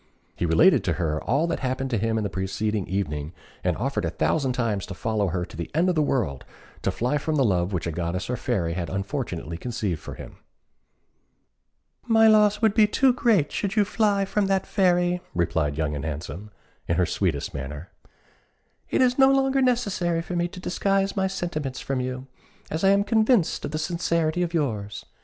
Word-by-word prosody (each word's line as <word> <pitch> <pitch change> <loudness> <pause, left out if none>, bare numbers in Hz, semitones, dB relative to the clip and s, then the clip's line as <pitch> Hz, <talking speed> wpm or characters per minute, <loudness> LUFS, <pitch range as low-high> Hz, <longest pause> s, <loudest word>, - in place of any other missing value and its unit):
He 85 - -1
related 80 0 +5
to - - +1
her 80 -3 -2
all 140 +7 +2
that 170 - -2
happened 130 0 -2
to 115 - +1
him 115 +2 0
the - - 0
preceding 100 +2 -2
evening, 80 -5 -3 0.3
and - - 0
offered - - -1
a - - 0
thousand 135 -5 0
times 110 -6 -1
to 100 - -7
follow 110 0 -1
her 90 0 -2
to 85 - -13
the 85 0 -5
end 175 +4 +3
of - - +2
the 155 - +2
world 115 - -1 0.4
to - - 0
fly 125 +5 0
from 155 +2 -2
the 140 - +3
love 90 -3 +1
which 90 -4 -2
a 85 - -2
goddess 85 +3 -3
or 125 - -2
a - - -2
fairy 90 -10 -1
had 85 -1 -3
unfortunately 95 - -4
conceived 105 -7 -3
for - - -8
him. - - -11 1.7
"My 225 -1 +5
loss 210 0 +4
would 220 -2 +4
be 215 -1 +5
too 260 +4 +3
great 215 - +2
should 195 -1 -2
you 210 -2 +4
fly 205 -2 +1
from 200 0 0
that 195 -1 +1
fairy," 180 -2 +2
replied 80 -4 0
Young 75 -2 -1
and 70 - -4
Handsome, 80 +7 -6 0.4
in 85 - +1
her 90 +1 +3
sweetest 80 -3 -1
manner. 70 +5 -6 1.0
"It - - +3
is 250 +1 +2
no 265 0 +7
longer 270 0 +2
necessary 200 -10 +1
for 180 - -5
me 175 0 +1
to 180 - -10
disguise 195 +2 0
my 190 -1 +1
sentiments 165 -8 -4
from 135 -1 -2
you, 130 0 -4 0.5
as 160 +3 -2
I 195 - +6
am 200 +1 +4
convinced 220 -2 +2
of - - -3
the 155 - -3
sincerity 165 0 0
of 175 -1 0
yours. 110 -11 -2
135 Hz, 200 wpm, -25 LUFS, -, 1.7 s, no